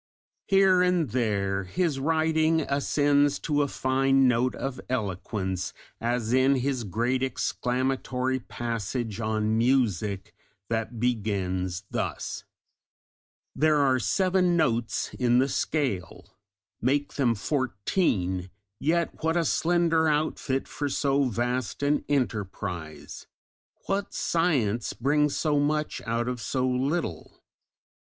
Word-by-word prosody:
Here 195 -2 +5
and 180 -8 +2
there 100 -5 0
his 150 - -1
writing 160 +2 +2
ascends 145 0 +2
to 145 -2 +1
a 145 - +1
fine 135 0 +2
note 125 +1 +2
of 135 -2 -4
eloquence, 95 -4 -2 0.3
as 120 0 -1
in 130 +2 +4
his 130 -1 -1
great 120 +6 -1
exclamatory 130 0 -1
passage 115 -2 -4
on 110 0 0
music 110 -6 +1 0.4
that 115 0 -2
begins 95 -6 -1
thus: - - -3 1.1
There 155 0 +3
are 135 -3 +3
seven 185 - +2
notes 120 -8 0
in 120 -1 +3
the 130 +2 +4
scale; 115 - -2 0.5
make 145 +4 0
them 125 -5 +2
fourteen: 100 - -1 0.3
yet 165 +3 0
what 165 +1 +2
a 170 - +1
slender 165 -1 +2
outfit 150 -3 -1
for 145 -1 -3
so 140 0 +1
vast 125 +2 -2
an 145 +1 +2
enterprise! 100 - -3 0.6
What 195 +1 -2
science 135 - +1
brings 145 +3 +1
so 150 -2 +1
much 150 +1 0
out 115 +1 0
of 125 -2 -3
so 130 +1 -1
little? 130 - -2
130 Hz, 110 wpm, -27 LUFS, 110-150 Hz, 1.1 s, Here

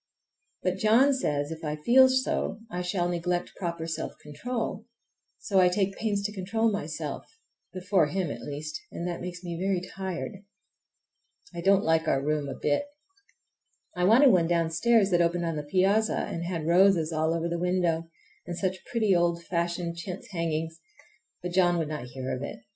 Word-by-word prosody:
But 185 0 0
John 230 +8 +5
says 145 - -1
if 160 +1 -7
I 150 -1 -2
feel 250 +12 +6
so 260 -5 0
I 180 - -3
shall 180 0 -1
neglect 175 0 -1
proper 170 -3 -3
self 165 -1 -4
control; 225 - -4 0.5
so 195 -3 +1
I 180 -1 +6
take 195 +1 0
pains 205 -2 -1
to 205 - -2
control 220 +4 0
myself,—before 185 - -3
him, 175 -1 -2
at - - -7
least,—and 150 +4 -6
that 175 - -4
makes 180 0 -6
me 170 -1 -5
very 190 -1 +1
tired. 190 +2 -5 1.2
I 170 - -5
don't 195 +2 +4
like 160 0 +2
our 135 - +3
room 145 0 -1
a 130 - -5
bit. 150 - 0 1.1
I 180 - -1
wanted 250 +7 +7
one 170 -4 +3
downstairs 175 +6 +2
that 175 -1 +4
opened 170 0 +1
on 165 -1 -1
the 150 - -2
piazza 200 +5 +2
and 170 0 -3
had 170 -3 -3
roses 175 -1 +4
all 160 +1 +1
over 165 0 -1
the 170 0 -2
window, 175 -2 0 0.4
and 175 -1 -4
such 185 -1 -2
pretty 215 -5 +2
old 170 -1 +1
fashioned 170 0 -2
chintz 180 +4 -7
hangings! 165 -2 -2 0.6
but 180 - -3
John 175 -1 +3
would 160 -3 -1
not 150 -5 -4
hear 130 +1 -5
of 130 - -7
it. 140 - -6
175 Hz, 170 wpm, -28 LUFS, 165-195 Hz, 1.2 s, wanted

